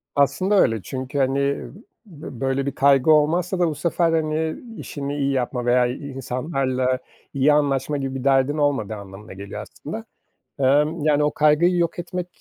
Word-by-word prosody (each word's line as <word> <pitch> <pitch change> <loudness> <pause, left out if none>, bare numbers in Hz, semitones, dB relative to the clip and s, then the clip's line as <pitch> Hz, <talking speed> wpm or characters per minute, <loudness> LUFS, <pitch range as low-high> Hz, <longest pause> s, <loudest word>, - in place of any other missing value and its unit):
Aslında 185 +8 +2
öyle 115 -3 +2
çünkü, 130 +6 -5
hani, 135 +1 +1 0.7
b 150 - -10
böyle 135 0 0
bir 140 - -1
kaygı 140 +2 +4
olmazsa 170 +5 +2
da 175 - +3
bu 155 - -2
sefer, 165 +2 +1
hani, 160 0 0 0.2
işini 145 0 -5
iyi 140 -1 0
yapma 125 -2 -2
veya 125 0 +4
i 135 +3 -6
insanlarla 130 -1 -1 0.3
iyi 140 +2 +3
anlaşma 145 0 +1
gibi 135 -1 -4
bir 130 - -4
derdin 135 +2 +2
olmadığı 135 -8 0
anlamına 100 0 -11
geliyor 100 +1 -7
aslında. - - -8 0.5
Emm, 150 +5 +2
yani, 150 -1 +3
o 150 - +2
kaygıyı 155 +4 +3
yok 170 0 0
etmek 180 0 -4
140 Hz, 165 wpm, -22 LUFS, 130-155 Hz, 0.7 s, kaygı